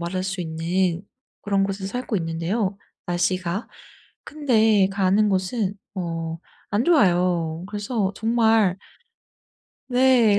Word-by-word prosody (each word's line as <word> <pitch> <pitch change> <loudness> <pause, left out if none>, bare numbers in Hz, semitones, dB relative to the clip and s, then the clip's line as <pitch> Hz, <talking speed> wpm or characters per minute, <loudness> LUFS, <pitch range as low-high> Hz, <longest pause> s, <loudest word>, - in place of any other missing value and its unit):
말할 185 +2 -2
수 190 -1 -3
있는 170 +2 -1 0.4
그런 200 -1 +1
곳에서 195 0 -3
살고 245 -1 -3
있는데요 175 +5 -1 0.3
날씨가. 180 +2 -1 0.6
근데 225 -9 +3
가는 200 +2 +2
곳은 195 +2 -1 0.2
어 165 -3 -3 0.4
안 220 +5 +2
좋아요. 175 - +2
그래서 205 -1 -2
정말 225 -4 +2 1.1
네. 245 -5 +4
195 Hz, 210 characters per minute, -23 LUFS, 175-220 Hz, 1.1 s, 네